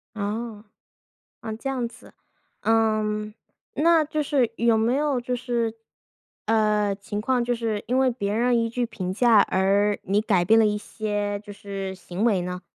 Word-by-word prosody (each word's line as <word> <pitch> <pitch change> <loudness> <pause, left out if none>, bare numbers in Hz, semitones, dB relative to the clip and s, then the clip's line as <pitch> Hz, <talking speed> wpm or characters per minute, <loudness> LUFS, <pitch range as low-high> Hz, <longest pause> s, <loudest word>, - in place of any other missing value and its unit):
哦， 215 +1 -4 0.8
嗯， 220 -1 -5
这 270 - -4
样 255 -3 -1
子。 230 - -16 0.5
嗯， 215 -1 +1 0.4
那 330 +1 +4
就 305 0 -2
是 270 -5 +1
有 235 -1 +3
没 230 +3 +2
有 285 -2 +1
就 250 +1 -2
是， 240 -2 -2 0.7
呃 210 -2 +2
情 200 +1 -5
况 250 +2 +1
就 245 0 0
是， 220 -3 -2
因 255 +2 +2
为 260 -1 +3
别 205 -4 -3
人 240 +2 +2
一 230 0 0
句 245 +1 -1
评 190 -5 -4
价 230 0 +5
而 200 +2 +2
你 200 +2 +1
改 195 -5 +2
变 225 +5 +5
了 220 - +5
一 210 0 +1
些， 205 -1 -3
就 210 -1 -11
是， 195 -1 -6
行 180 +2 -5
为 205 -6 +2
呢？ 180 0 -5
220 Hz, 185 characters per minute, -24 LUFS, 205-240 Hz, 0.8 s, 价